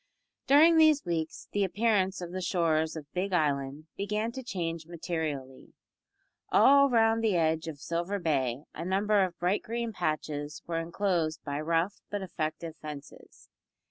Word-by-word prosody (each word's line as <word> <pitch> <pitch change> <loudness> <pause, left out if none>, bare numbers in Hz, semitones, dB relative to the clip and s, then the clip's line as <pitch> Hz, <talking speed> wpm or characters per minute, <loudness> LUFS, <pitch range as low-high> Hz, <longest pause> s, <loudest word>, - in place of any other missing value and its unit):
During 320 +4 +7
these 310 -2 +5
weeks 165 -2 -3
the 205 - +1
appearance 195 -1 +1
of 175 -1 -6
the 185 +1 -4
shores 160 -3 +1
of 150 -3 -9
Big 190 +2 -2
Island 145 -2 0
began 210 +3 -2
to 260 - -6
change 165 -8 -4
materially. 155 -6 -5 0.8
All 280 0 +6
round 225 -1 +3
the 215 -4 +2
edge 160 -1 +1
of 155 -3 -6
Silver 170 +6 -2
Bay 140 -7 -1
a 165 - -6
number 200 +3 +2
of 180 -2 -3
bright 180 +4 +1
green 235 0 -3
patches 150 -4 -3
were 165 -1 -2
enclosed 170 -2 -1
by 145 +1 -3
rough 165 +5 0
but 205 -1 -3
effective 160 -2 -4
fences. 150 -2 -10
170 Hz, 150 wpm, -29 LUFS, 155-205 Hz, 0.8 s, During